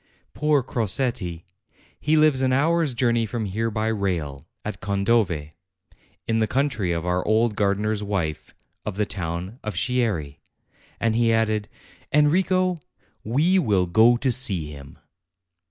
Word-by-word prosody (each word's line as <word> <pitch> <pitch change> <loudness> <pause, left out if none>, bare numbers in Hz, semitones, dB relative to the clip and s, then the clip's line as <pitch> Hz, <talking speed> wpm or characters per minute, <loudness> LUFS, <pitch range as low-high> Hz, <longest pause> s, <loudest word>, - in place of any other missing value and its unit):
Poor 150 -3 +2
Crosetti! 110 -7 -1 0.6
He 155 +1 +2
lives 155 -4 +4
an 130 -1 +2
hour's 155 +1 +2
journey 115 -2 +1
from 110 +1 -3
here 110 +4 -1
by 110 0 -1
rail, 85 -9 -2 0.2
at 105 - -5
Condove, 100 -6 0 0.8
in 115 0 +1
the 110 - +2
country 120 -9 0
of 85 0 -2
our 90 0 0
old 110 0 +2
gardener's 105 +1 0
wife, 95 -7 -3 0.3
of 105 - -4
the 105 +1 0
town 90 +4 -5
of 110 -3 -4
Chieri." 95 - -1 0.6
And 115 -1 +1
he 115 0 +3
added, 110 -2 +1 0.4
"Enrico, 180 +4 +2 0.4
we 155 - +2
will 100 - +2
go 110 +7 +5
to 130 +1 0
see 95 -11 0
him." 70 -2 -12
110 Hz, 140 wpm, -24 LUFS, 95-125 Hz, 0.8 s, go